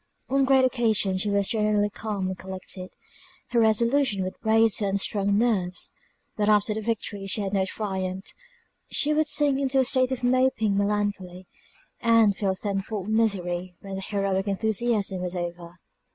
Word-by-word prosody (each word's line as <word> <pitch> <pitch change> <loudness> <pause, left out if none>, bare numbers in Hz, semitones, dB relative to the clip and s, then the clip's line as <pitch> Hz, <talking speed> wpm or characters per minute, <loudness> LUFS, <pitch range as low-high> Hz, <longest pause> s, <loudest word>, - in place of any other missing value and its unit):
On 275 +1 +3
great 265 -1 +4
occasions 220 -7 +1
she 210 - -1
was 200 -1 +1
generally 210 -2 +1
calm 205 -2 -4
and 190 - -3
collected, 185 0 -6 0.6
her 240 - +1
resolution 230 -1 +2
would 185 - -4
brace 225 0 +4
her 205 - 0
unstrung 200 +1 +1
nerves; 195 -6 0 0.4
but 210 0 +1
after 210 0 +3
the 220 - -4
victory 210 -3 -3
she 205 +2 -1
had 195 0 -3
no 190 -1 +2
triumph; 190 -2 -4 0.6
she 300 +1 +2
would 310 0 +2
sink 290 -2 +2
into 270 -1 0
a 265 - +5
state 255 0 +1
of 260 -1 -3
moping 250 -4 +2
melancholy, 200 -3 -2 0.5
and 230 -3 +4
feel 190 -2 -1
ten 195 0 -2
fold 205 0 -5
misery 185 -5 0
when 195 -1 -8
the 190 - -4
heroic 195 -1 -1
enthusiasm 205 -1 0
was 180 0 -4
over. 175 0 -6
205 Hz, 165 wpm, -25 LUFS, 190-230 Hz, 0.6 s, a